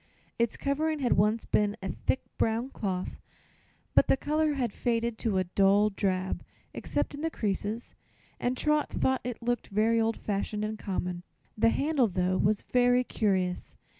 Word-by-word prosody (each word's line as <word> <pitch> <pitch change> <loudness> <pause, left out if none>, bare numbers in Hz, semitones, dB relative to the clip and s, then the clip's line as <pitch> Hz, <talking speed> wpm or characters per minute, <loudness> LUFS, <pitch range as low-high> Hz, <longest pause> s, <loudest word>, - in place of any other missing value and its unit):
Its 235 -1 +1
covering 310 +3 0
had 260 -4 +2
once 210 +3 +2
been 205 0 +1
of 190 -1 -4
thick - - +2 0.2
brown 230 +3 +1
cloth, 185 -6 -3 0.8
but - - +5
the - - +4
color 305 +2 +1
had 245 -6 -1
faded 235 -1 0
to 215 -5 0
a 185 - +3
dull 200 +3 +3
drab, 190 -2 -1 0.3
except - - -2
in 290 - -6
the 325 - 0
creases, 215 -2 -3 0.5
and 250 +1 -1
Trot 300 +1 +2
thought 260 -1 0
it 245 -1 -5
looked 240 0 -1
very 225 +3 +2
old 225 0 0
fashioned 210 +1 -2
and 215 0 -4
common. 180 -2 -3 0.3
The 225 +1 +4
handle, 280 0 +2
though, 185 -1 0
was 205 +1 +1
really 245 0 +4
curious. 190 -6 -1
220 Hz, 165 wpm, -29 LUFS, 200-250 Hz, 0.8 s, but